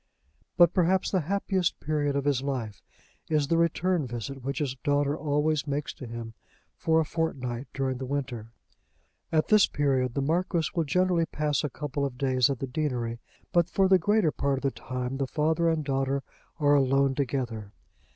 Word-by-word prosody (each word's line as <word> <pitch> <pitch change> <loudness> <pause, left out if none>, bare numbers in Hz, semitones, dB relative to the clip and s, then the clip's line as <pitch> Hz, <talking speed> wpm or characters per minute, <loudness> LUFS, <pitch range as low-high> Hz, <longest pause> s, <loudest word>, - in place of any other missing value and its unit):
But 175 -1 +6
perhaps 185 +1 +2
the 190 - +2
happiest 195 -2 0
period 145 -2 -1
of 140 0 -1
his 140 -3 +2
life 125 -7 -4 0.5
is 150 -2 +1
the 165 - +3
return 170 -2 +1
visit 125 +3 -6
which 135 +2 -3
his 145 -5 -1
daughter 145 0 +1
always 150 0 0
makes 145 +1 -2
to 130 - -9
him 115 -1 -7 0.4
for 160 0 +2
a 160 - +1
fortnight 135 -6 -3
during 130 -2 -2
the 130 - -4
winter. 125 -5 -4 0.8
At 155 -1 +1
this 215 -2 +6
period 130 -4 0
the 140 - 0
Marquis 170 +1 0
will 165 -2 0
generally 180 +1 +2
pass 150 -2 -1
a 150 - -1
couple 145 +1 -4
of 135 -3 -3
days 130 -1 +2
at 135 - -1
the 135 - -3
deanery, 125 -4 -2 0.3
but 175 0 +3
for 195 0 +3
the 190 -1 +5
greater 205 -2 +2
part 140 -1 0
of 135 - -6
the 135 - +1
time 125 +1 -4
the 135 -1 -1
father 160 +4 +1
and 160 -2 0
daughter 135 0 0 0.4
are 145 -1 +4
alone 135 0 +3
together. 120 -6 -3
145 Hz, 180 wpm, -27 LUFS, 130-160 Hz, 0.8 s, But